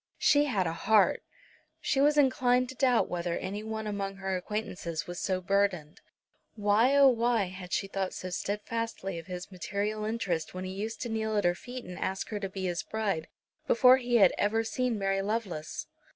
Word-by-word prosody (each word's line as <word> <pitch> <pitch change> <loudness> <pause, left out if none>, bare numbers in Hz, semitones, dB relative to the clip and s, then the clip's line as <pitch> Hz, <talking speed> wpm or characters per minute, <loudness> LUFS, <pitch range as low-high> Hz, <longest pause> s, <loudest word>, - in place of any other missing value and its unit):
She 290 0 +4
had 205 -10 0
a 165 - -1
heart! 210 +4 +3 0.6
She 270 - +1
was 295 +1 +4
inclined 255 -3 +3
to 260 - -8
doubt 255 -2 +3
whether 175 -1 -2
any 200 +3 -4
one 220 0 -4
among 200 -2 -3
her 190 -1 -2
acquaintances 180 -5 -4
was 175 0 -6
so 185 -2 0
burdened. 185 -5 0 0.5
Why, 215 +5 +3
oh 280 -1 +8
why, 235 -2 +2
had 185 -1 -9
she - - 0
thought 195 -1 -2
so 185 - -6
steadfastly 205 -1 -3
of 165 - -12
his 180 +1 -7
material 200 +4 -3
interests 195 -8 -2
when 185 - -4
he 185 - -5
used 215 +3 -5
to 240 - -4
kneel 220 -1 -1
at 205 - +2
her 175 - +3
feet 245 +7 -8
and 180 0 -8
ask 190 0 -2
her 210 - -3
to 195 -1 -4
be 190 0 -5
his 175 -2 -1
bride, 200 -7 -2 0.4
before 255 +2 +7
he 245 -2 -1
had 215 - +6
ever 225 +2 +2
seen 245 0 -1
Mary 195 -1 0
Lovelace? 195 -7 -3
205 Hz, 195 wpm, -29 LUFS, 185-230 Hz, 0.6 s, oh